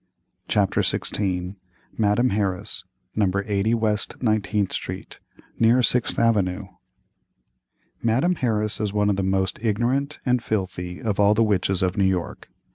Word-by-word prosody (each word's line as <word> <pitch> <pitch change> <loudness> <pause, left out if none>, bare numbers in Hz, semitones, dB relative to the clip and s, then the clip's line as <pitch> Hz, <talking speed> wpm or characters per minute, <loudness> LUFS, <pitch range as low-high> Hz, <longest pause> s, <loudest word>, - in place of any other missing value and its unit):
CHAPTER 100 -2 +2
XVI. 95 -1 -2 0.4
MADAME 110 +4 +2
HARRIS, 95 -3 -2 0.3
No. 105 -3 +2 0.2
80 105 +2 +1
WEST 110 -2 -1
19TH 105 -3 0
STREET, - - -6 0.4
NEAR 115 +2 +4
SIXTH 120 0 +1
AVENUE. 100 -4 +1 1.3
Madame 130 +10 +2
Harris 110 -8 -1
is 105 -2 -1
one 105 0 +2
of - - 0
the 95 - -1
most 95 0 0
ignorant 120 +7 0
and 125 -2 +2
filthy 90 -3 -3
of 105 -4 -2
all 105 +1 +5
the 115 - +4
witches 95 -3 +1
of 95 +3 0
New 100 - +3
York. 95 -2 -2
105 Hz, 135 wpm, -24 LUFS, 95-115 Hz, 1.3 s, all